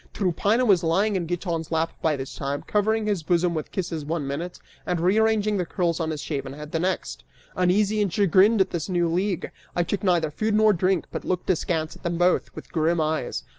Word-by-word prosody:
Tryphaena 205 Hz, +6 st, +1 dB
was 195 Hz, -6 st, +4 dB
lying 195 Hz, +6 st, +2 dB
in 175 Hz, -3 st, -1 dB
Giton's 170 Hz, -2 st, -3 dB
lap 165 Hz, 0 st, 0 dB
by 160 Hz, -2 st, +2 dB
this 135 Hz, -1 st, -6 dB
time, 140 Hz, 0 st, -3 dB
covering 215 Hz, +1 st, +1 dB
his 205 Hz, -5 st, 0 dB
bosom 175 Hz, +1 st, +1 dB
with 155 Hz, -2 st, -4 dB
kisses 170 Hz, -5 st, -3 dB
one 155 Hz, 0 st, -2 dB
minute 160 Hz, +6 st, -4 dB, 0.3 s
and 180 Hz, -2 st, -1 dB
rearranging 210 Hz, +3 st, +2 dB
the 180 Hz, -, 0 dB
curls 170 Hz, -4 st, -1 dB
upon 160 Hz, -1 st, -1 dB
his 155 Hz, -2 st, -4 dB
shaven 135 Hz, -3 st, -4 dB
head 150 Hz, +1 st, -9 dB
the 165 Hz, -, -1 dB
next. 185 Hz, +2 st, -2 dB, 0.3 s
Uneasy 200 Hz, +4 st, +2 dB
and 200 Hz, -3 st, 0 dB
chagrined 200 Hz, +3 st, +4 dB
at -, -, +1 dB
this 170 Hz, +1 st, -3 dB
new 175 Hz, -2 st, +1 dB
league, 180 Hz, +2 st, -1 dB, 0.2 s
I 175 Hz, -, +2 dB
took 200 Hz, +5 st, -3 dB
neither 170 Hz, -5 st, +2 dB
food 215 Hz, +7 st, 0 dB
nor 215 Hz, 0 st, +5 dB
drink 185 Hz, -1 st, +1 dB
but -, -, -5 dB
looked 185 Hz, +1 st, -1 dB
askance 160 Hz, -2 st, -1 dB
at -, -, -16 dB
them 170 Hz, -1 st, -2 dB
both, 175 Hz, +1 st, +2 dB
with -, -, -10 dB
grim 165 Hz, +1 st, +1 dB
eyes. 155 Hz, 0 st, -1 dB
175 Hz, 210 wpm, -25 LUFS, 160-200 Hz, 0.3 s, nor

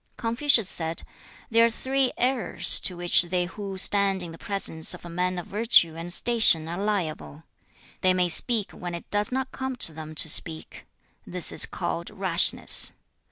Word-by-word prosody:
Confucius 235 Hz, -1 st, +2 dB
said, 165 Hz, -3 st, -4 dB, 0.5 s
'There 230 Hz, +1 st, +4 dB
are -, -, +1 dB
three 260 Hz, +2 st, -2 dB
errors 250 Hz, -1 st, +1 dB
to 180 Hz, -, -2 dB
which 175 Hz, 0 st, +3 dB
they 180 Hz, 0 st, -2 dB
who 195 Hz, +1 st, -8 dB
stand 195 Hz, -1 st, +2 dB
in 170 Hz, -, -8 dB
the 165 Hz, -, -13 dB
presence 195 Hz, -5 st, -4 dB
of -, -, -15 dB
a 170 Hz, -, -10 dB
man 180 Hz, +1 st, -3 dB
of 175 Hz, -, -6 dB
virtue 205 Hz, -6 st, +2 dB
and 165 Hz, +1 st, -7 dB
station 220 Hz, -7 st, +3 dB
are 170 Hz, +3 st, -6 dB
liable. 165 Hz, -6 st, -4 dB, 0.6 s
They 185 Hz, 0 st, +2 dB
may 180 Hz, -1 st, 0 dB
speak 215 Hz, +4 st, +5 dB
when 175 Hz, -1 st, -8 dB
it 170 Hz, -, -10 dB
does 205 Hz, +2 st, -1 dB
not 265 Hz, 0 st, -4 dB
come 265 Hz, -1 st, -6 dB
to 165 Hz, -, +2 dB
them 155 Hz, 0 st, -10 dB
to 160 Hz, -, 0 dB
speak; 160 Hz, +1 st, -2 dB, 0.4 s
this 180 Hz, -1 st, -3 dB
is -, -, +2 dB
called 170 Hz, +1 st, -5 dB
rashness. 190 Hz, -4 st, +2 dB
185 Hz, 175 wpm, -24 LUFS, 170-225 Hz, 0.6 s, speak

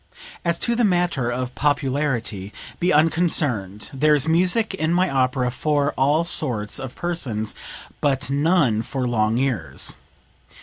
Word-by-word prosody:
"As 170 Hz, -1 st, +1 dB
to 235 Hz, -, 0 dB
the 240 Hz, -, +1 dB
matter 175 Hz, -, +1 dB
of 125 Hz, +1 st, -3 dB
popularity, 135 Hz, -8 st, -1 dB, 0.3 s
be 180 Hz, +1 st, +2 dB
unconcerned; 150 Hz, -, +1 dB
there 150 Hz, +3 st, +3 dB
is 145 Hz, +1 st, +1 dB
music 185 Hz, +7 st, +2 dB
in 160 Hz, -4 st, -1 dB
my 180 Hz, +2 st, +2 dB
opera 130 Hz, -3 st, 0 dB
for 145 Hz, +2 st, 0 dB
all 145 Hz, +5 st, +2 dB
sorts 120 Hz, -11 st, +1 dB
of 130 Hz, -2 st, -7 dB
persons 125 Hz, -12 st, -3 dB, 0.5 s
but 140 Hz, -1 st, 0 dB
none 140 Hz, -5 st, +2 dB
for 125 Hz, +2 st, -3 dB
long 110 Hz, -1 st, +1 dB
ears." 130 Hz, -3 st, -1 dB
140 Hz, 135 wpm, -22 LUFS, 125-165 Hz, 0.5 s, there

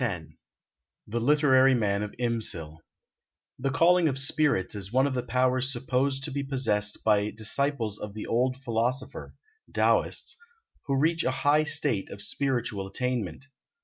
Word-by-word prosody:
X 90 Hz, -9 st, -2 dB, 0.8 s
THE 115 Hz, +3 st, -3 dB
LITERARY 135 Hz, 0 st, +4 dB
MAN 100 Hz, -3 st, 0 dB
OF 105 Hz, -1 st, -5 dB
IMSIL 110 Hz, -10 st, -2 dB, 0.8 s
[The 135 Hz, -, -1 dB
calling 170 Hz, +4 st, +4 dB
of 135 Hz, -, -3 dB
spirits 135 Hz, -7 st, +1 dB
is 100 Hz, -1 st, -5 dB
one 130 Hz, +2 st, +3 dB
of 140 Hz, -, -1 dB
the 125 Hz, -, -1 dB
powers 130 Hz, +1 st, +1 dB
supposed 135 Hz, +2 st, -1 dB
to 150 Hz, -, -2 dB
be 140 Hz, +1 st, -2 dB
possessed 115 Hz, -7 st, -1 dB
by 105 Hz, -1 st, +2 dB
disciples 110 Hz, 0 st, -1 dB
of 105 Hz, -1 st, -7 dB
the 110 Hz, -, -5 dB
Old 125 Hz, +2 st, 0 dB
Philosopher 125 Hz, +1 st, -2 dB, 0.4 s
(Taoists), -, -, +1 dB, 0.5 s
who 135 Hz, -1 st, +1 dB
reach 165 Hz, +4 st, +1 dB
a -, -, +1 dB, 0.2 s
high 150 Hz, +2 st, +4 dB
state 130 Hz, -9 st, 0 dB
of 100 Hz, -, -9 dB
spiritual 120 Hz, -7 st, -1 dB
attainment. 125 Hz, +2 st, -3 dB
125 Hz, 145 wpm, -27 LUFS, 105-135 Hz, 0.8 s, LITERARY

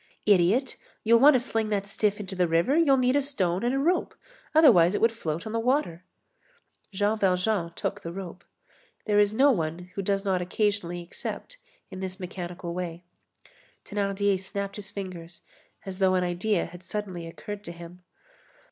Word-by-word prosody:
"Idiot, 205 Hz, +6 st, +3 dB, 0.3 s
you'll 230 Hz, +1 st, +5 dB
want 285 Hz, +3 st, +7 dB
to -, -, +4 dB
sling 225 Hz, -3 st, -1 dB
that 200 Hz, -2 st, -1 dB
stiff 205 Hz, +1 st, -1 dB
into 200 Hz, -1 st, -6 dB
the 180 Hz, -1 st, +2 dB
river, 170 Hz, -, +2 dB
you'll 305 Hz, -5 st, +4 dB
need 255 Hz, +1 st, +2 dB
a 285 Hz, -, +4 dB
stone 190 Hz, -10 st, -1 dB
and 245 Hz, +2 st, +1 dB
a -, -, +1 dB
rope, 335 Hz, +7 st, +1 dB, 0.4 s
otherwise 190 Hz, -, +6 dB
it -, -, 0 dB
would 230 Hz, -, +4 dB
float 165 Hz, -8 st, -4 dB
on 220 Hz, -, -5 dB
the 230 Hz, -, 0 dB
water." 230 Hz, -, 0 dB, 0.9 s
Jean 205 Hz, +3 st, 0 dB
Valjean 180 Hz, -2 st, +1 dB
took 205 Hz, -, -3 dB
the 170 Hz, -, -6 dB
rope. 180 Hz, -1 st, -8 dB, 0.6 s
There 210 Hz, -1 st, +3 dB
is 205 Hz, 0 st, +4 dB
no 270 Hz, +6 st, +5 dB
one 175 Hz, -2 st, -3 dB
who 195 Hz, -, -3 dB
does 195 Hz, +1 st, -1 dB
not 190 Hz, -2 st, +1 dB
occasionally 180 Hz, -2 st, -1 dB
accept -, -, -7 dB, 0.3 s
in 185 Hz, -, -7 dB
this 190 Hz, +1 st, -5 dB
mechanical 175 Hz, -2 st, -6 dB
way. 175 Hz, -1 st, -5 dB, 0.8 s
Thénardier 200 Hz, -1 st, 0 dB
snapped 200 Hz, +1 st, -5 dB
his 205 Hz, -1 st, -7 dB
fingers 180 Hz, -4 st, -8 dB, 0.4 s
as 190 Hz, -1 st, -7 dB
though 190 Hz, -1 st, +3 dB
an 180 Hz, -, +2 dB
idea 180 Hz, +2 st, 0 dB
had 175 Hz, +1 st, -11 dB
suddenly 185 Hz, -3 st, -5 dB
occurred 185 Hz, +6 st, -8 dB
to -, -, -6 dB
him. 170 Hz, +1 st, -11 dB
195 Hz, 175 wpm, -27 LUFS, 175-215 Hz, 0.9 s, want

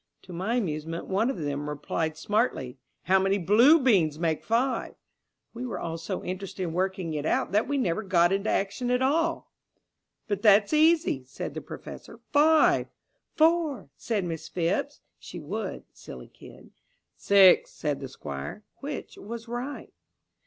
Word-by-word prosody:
To 180 Hz, -, -11 dB
my 190 Hz, +7 st, -2 dB
amusement 165 Hz, -6 st, -3 dB
one 205 Hz, +6 st, 0 dB
of 270 Hz, -, -3 dB
them 145 Hz, -2 st, -3 dB
replied 155 Hz, +2 st, -3 dB
smartly, 160 Hz, -, -1 dB, 0.2 s
'How 190 Hz, +1 st, +3 dB
many 195 Hz, +1 st, +1 dB
blue 225 Hz, -, +5 dB
beans 185 Hz, -, +3 dB
make 160 Hz, -1 st, -1 dB
five?' 245 Hz, +4 st, 0 dB, 0.6 s
We 240 Hz, +1 st, -6 dB
were 250 Hz, -, -4 dB
all 165 Hz, 0 st, -4 dB
so 180 Hz, +3 st, -5 dB
interested 190 Hz, +1 st, -5 dB
in 165 Hz, -3 st, -3 dB
working 185 Hz, -2 st, -2 dB
it 150 Hz, -1 st, -3 dB
out -, -, 0 dB
that 210 Hz, +3 st, +2 dB
we 285 Hz, -, -1 dB
never 185 Hz, -7 st, 0 dB
got 175 Hz, -3 st, +3 dB
into 195 Hz, +2 st, 0 dB
action 205 Hz, +6 st, -1 dB
at 250 Hz, +1 st, +2 dB
all." 330 Hz, +5 st, 0 dB, 0.8 s
"But 205 Hz, -2 st, -2 dB
that's 205 Hz, +3 st, +5 dB
easy," 315 Hz, -, +3 dB
said 130 Hz, -, -6 dB
the -, -, -5 dB
Professor. -, -, -10 dB
"Five." 310 Hz, +2 st, +4 dB, 0.5 s
"Four," 320 Hz, -3 st, +2 dB
said 215 Hz, -4 st, -2 dB
Miss 165 Hz, -2 st, -5 dB
Phipps. 180 Hz, +11 st, -2 dB, 0.2 s
(She -, -, -9 dB
would. -, -, -5 dB
Silly -, -, -11 dB
kid!) -, -, -15 dB, 0.4 s
"Six," 195 Hz, -2 st, +5 dB
said 145 Hz, -3 st, -3 dB
the 135 Hz, -2 st, -7 dB
Squire. 70 Hz, -, -7 dB, 0.2 s
Which 285 Hz, +1 st, -7 dB
was 230 Hz, +2 st, -8 dB
right? 245 Hz, +4 st, -6 dB
195 Hz, 155 wpm, -27 LUFS, 165-250 Hz, 0.8 s, blue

